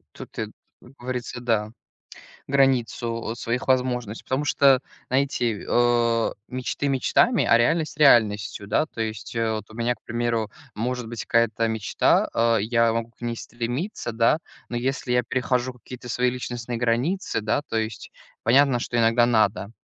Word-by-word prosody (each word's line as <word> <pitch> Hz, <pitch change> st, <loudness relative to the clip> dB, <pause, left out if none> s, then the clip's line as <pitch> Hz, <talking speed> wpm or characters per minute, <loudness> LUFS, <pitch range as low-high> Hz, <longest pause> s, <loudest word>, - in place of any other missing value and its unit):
Тут, -, -, -11 dB
э, -, -, 0 dB
м, -, -, -7 dB, 0.3 s
как 125 Hz, -, -17 dB
говорится, 125 Hz, 0 st, -5 dB
да. 110 Hz, -3 st, 0 dB, 0.8 s
Границу, 120 Hz, -4 st, +1 dB
э, -, -, -6 dB
своих 120 Hz, +3 st, -3 dB
возможностей, 125 Hz, -4 st, 0 dB
потому 130 Hz, +3 st, -1 dB
что, 140 Hz, -3 st, +4 dB, 0.3 s
знаете, 125 Hz, -5 st, 0 dB
э, 120 Hz, -1 st, +2 dB, 0.2 s
мечты 130 Hz, +3 st, -3 dB
мечтами, 185 Hz, -, +3 dB
а -, -, +5 dB
реальность 155 Hz, +6 st, +1 dB
реальностью. 110 Hz, -7 st, +4 dB
Да, 110 Hz, +9 st, +1 dB
то 115 Hz, -, -10 dB
есть, 110 Hz, 0 st, -4 dB
э, 115 Hz, -1 st, +1 dB
вот 110 Hz, 0 st, -5 dB
у -, -, -12 dB
меня, 120 Hz, +1 st, 0 dB
к -, -, -30 dB
примеру, 115 Hz, -2 st, -1 dB, 0.2 s
может 125 Hz, +2 st, -3 dB
быть 115 Hz, -1 st, -5 dB
какая-то 115 Hz, -1 st, +2 dB
мечта, 110 Hz, -2 st, +2 dB
э, 115 Hz, 0 st, +3 dB
я 115 Hz, +1 st, +2 dB
могу 115 Hz, 0 st, -2 dB
к -, -, -36 dB
ней 120 Hz, -1 st, -3 dB
стремиться, 120 Hz, -, -4 dB
да, 115 Hz, +6 st, +3 dB, 0.3 s
но 120 Hz, -, -4 dB
если 130 Hz, 0 st, -2 dB
я 125 Hz, 0 st, +3 dB
перехожу 125 Hz, +1 st, -1 dB
какие-то 125 Hz, 0 st, -11 dB
свои 125 Hz, +1 st, +1 dB
личностные 120 Hz, -1 st, -5 dB
границы, 125 Hz, -, 0 dB
да, 110 Hz, +7 st, 0 dB
то 145 Hz, -, -5 dB
есть 110 Hz, -1 st, -3 dB, 0.3 s
понятно, 135 Hz, +1 st, +4 dB
что 120 Hz, -, -3 dB
иногда 115 Hz, +1 st, +4 dB
надо, 110 Hz, -4 st, +1 dB
120 Hz, 165 wpm, -24 LUFS, 115-125 Hz, 0.8 s, а